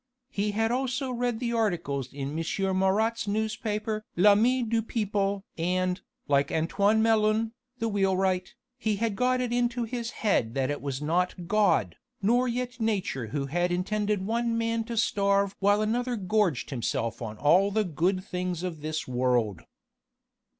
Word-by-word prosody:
He 205 Hz, +1 st, -1 dB
had 225 Hz, +2 st, +1 dB
also 260 Hz, +1 st, -1 dB
read 245 Hz, -2 st, -1 dB
the 235 Hz, -1 st, -2 dB
articles 170 Hz, -, -1 dB
in 140 Hz, -1 st, -4 dB
M. 190 Hz, +3 st, -1 dB
Marat's 215 Hz, +4 st, +1 dB
newspaper 215 Hz, 0 st, -2 dB
L'ami 210 Hz, +7 st, +5 dB
du 230 Hz, 0 st, +1 dB
Peuple! 200 Hz, -3 st, -1 dB
and, 180 Hz, +2 st, 0 dB, 0.3 s
like 140 Hz, -1 st, +2 dB
Antoine 200 Hz, +7 st, +2 dB
Melun, 220 Hz, 0 st, +2 dB, 0.3 s
the 230 Hz, -, -1 dB
wheelwright, 190 Hz, -3 st, 0 dB, 0.2 s
he 220 Hz, -3 st, 0 dB
had 220 Hz, 0 st, -1 dB
got 255 Hz, +3 st, +2 dB
it 245 Hz, -1 st, -1 dB
into 240 Hz, 0 st, +1 dB
his 235 Hz, 0 st, -3 dB
head 125 Hz, -, 0 dB
that 135 Hz, +1 st, 0 dB
it 145 Hz, -, -4 dB
was 140 Hz, 0 st, -4 dB
not 175 Hz, +3 st, 0 dB
God, 190 Hz, -, +2 dB, 0.2 s
nor 240 Hz, +5 st, +2 dB
yet 250 Hz, +1 st, -3 dB
Nature 190 Hz, -, -1 dB
who 140 Hz, +5 st, -2 dB
had 175 Hz, +5 st, 0 dB
intended 205 Hz, +2 st, 0 dB
one 230 Hz, +1 st, 0 dB
man 230 Hz, 0 st, 0 dB
to 230 Hz, 0 st, -5 dB
starve 200 Hz, -2 st, +2 dB
while 205 Hz, +2 st, +3 dB
another 240 Hz, +3 st, 0 dB
gorged 190 Hz, -, 0 dB
himself 115 Hz, -2 st, -2 dB
on 110 Hz, -2 st, -5 dB
all 175 Hz, -, +4 dB
the 215 Hz, +2 st, +1 dB
good 185 Hz, +2 st, 0 dB
things 180 Hz, -2 st, -3 dB
of 170 Hz, -4 st, -4 dB
this 155 Hz, +1 st, -3 dB
world. 120 Hz, -7 st, 0 dB
200 Hz, 155 wpm, -28 LUFS, 175-225 Hz, 0.3 s, L'ami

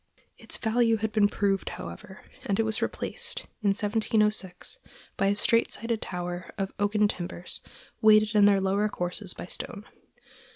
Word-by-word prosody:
Its -, -, -5 dB
value 230 Hz, 0 st, +2 dB
had 220 Hz, 0 st, -2 dB
been 210 Hz, -1 st, +4 dB
proved, 200 Hz, -1 st, 0 dB
however, 85 Hz, -, -9 dB, 0.2 s
and 200 Hz, +1 st, 0 dB
it -, -, +4 dB
was 220 Hz, 0 st, -1 dB
replaced, 475 Hz, -1 st, -1 dB, 0.2 s
in 210 Hz, -, 0 dB
1706, 210 Hz, -, 0 dB, 0.4 s
by 195 Hz, -, +1 dB
a 200 Hz, -, +2 dB
straight 230 Hz, +3 st, +3 dB
sided 230 Hz, -1 st, -2 dB
tower 175 Hz, 0 st, -5 dB
of 195 Hz, -1 st, -3 dB
oaken 210 Hz, +1 st, +3 dB
timbers, 180 Hz, -2 st, -2 dB, 0.4 s
weighted 215 Hz, 0 st, +6 dB
in 210 Hz, -1 st, +6 dB
their 200 Hz, -1 st, +5 dB
lower 195 Hz, +2 st, +1 dB
courses 180 Hz, +1 st, -3 dB
by -, -, -7 dB
stone. 200 Hz, +3 st, -6 dB
205 Hz, 155 wpm, -27 LUFS, 195-220 Hz, 0.4 s, weighted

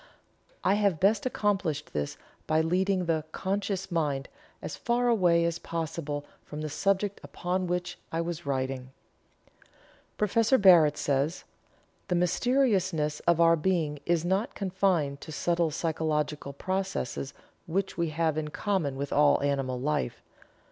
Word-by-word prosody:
I 195 Hz, -, +4 dB
have 195 Hz, -6 st, +2 dB
best 205 Hz, +5 st, +3 dB
accomplished 190 Hz, -, -1 dB
this 75 Hz, -1 st, -3 dB, 0.3 s
by 155 Hz, 0 st, +3 dB
leading 185 Hz, +3 st, +1 dB
the 160 Hz, -2 st, 0 dB
(conscious) 195 Hz, 0 st, -2 dB
mind 145 Hz, -5 st, -1 dB, 0.3 s
as -, -, -6 dB
far 245 Hz, 0 st, 0 dB
away 175 Hz, -7 st, +4 dB
as 170 Hz, 0 st, -1 dB
possible 160 Hz, -4 st, -4 dB, 0.2 s
from 150 Hz, 0 st, -7 dB
the 155 Hz, -, -3 dB
subject 195 Hz, +5 st, 0 dB
upon 180 Hz, +1 st, -2 dB
which 180 Hz, 0 st, -3 dB
I 165 Hz, -, -1 dB
was 170 Hz, 0 st, -3 dB
writing." 130 Hz, -2 st, -2 dB, 1.3 s
Prof. 225 Hz, +5 st, +3 dB
Barrett 165 Hz, -7 st, +7 dB
says: 145 Hz, +4 st, 0 dB, 0.6 s
"The 180 Hz, -, 0 dB
mysteriousness 185 Hz, -, +1 dB
of 170 Hz, -1 st, +4 dB
our 165 Hz, 0 st, +6 dB
being 160 Hz, -3 st, 0 dB
is 170 Hz, -1 st, +2 dB
not 190 Hz, +6 st, 0 dB
confined 180 Hz, -7 st, 0 dB
to -, -, -8 dB
subtle 170 Hz, +2 st, +1 dB
physiological 150 Hz, -2 st, -1 dB
processes 185 Hz, -5 st, -3 dB, 0.3 s
which 190 Hz, +4 st, -1 dB
we 170 Hz, -1 st, 0 dB
have 155 Hz, 0 st, 0 dB
in 155 Hz, -, -3 dB
common 165 Hz, -4 st, -1 dB
with 140 Hz, +1 st, -3 dB
all 145 Hz, 0 st, +5 dB
animal 135 Hz, -3 st, 0 dB
life. 145 Hz, -2 st, -2 dB
170 Hz, 135 wpm, -28 LUFS, 150-190 Hz, 1.3 s, Barrett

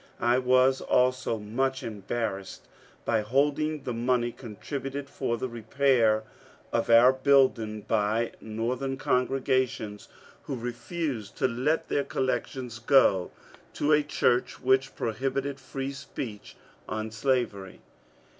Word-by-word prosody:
I 120 Hz, +2 st, +3 dB
was 130 Hz, +1 st, +3 dB
also 125 Hz, -2 st, +1 dB
much 130 Hz, +6 st, -2 dB
embarrassed 105 Hz, -2 st, -4 dB, 0.4 s
by 115 Hz, -2 st, +2 dB
holding 145 Hz, +6 st, 0 dB
the 125 Hz, -, -3 dB
money 120 Hz, 0 st, +1 dB
contributed 135 Hz, +5 st, -6 dB
for 120 Hz, -3 st, -2 dB
the 130 Hz, -, -3 dB
repair 120 Hz, -2 st, +2 dB, 0.5 s
of -, -, 0 dB
our 120 Hz, +3 st, +7 dB
building 130 Hz, -6 st, +3 dB
by 110 Hz, +2 st, 0 dB
Northern 125 Hz, +5 st, -3 dB
congregations 130 Hz, -5 st, 0 dB, 0.4 s
who 135 Hz, -, -3 dB
refused 120 Hz, -, -4 dB
to -, -, +2 dB
let 130 Hz, +6 st, 0 dB
their 140 Hz, -, 0 dB
collections 125 Hz, -2 st, -3 dB
go 115 Hz, -7 st, +4 dB, 0.5 s
to 150 Hz, -, +1 dB
a 150 Hz, 0 st, +6 dB
church 125 Hz, -4 st, +1 dB
which 130 Hz, +1 st, +2 dB
prohibited 135 Hz, +4 st, -2 dB
free 135 Hz, +1 st, -5 dB
speech 120 Hz, -5 st, -7 dB, 0.3 s
on 110 Hz, 0 st, -3 dB
slavery. 115 Hz, -5 st, -1 dB
125 Hz, 115 wpm, -28 LUFS, 115-135 Hz, 0.5 s, our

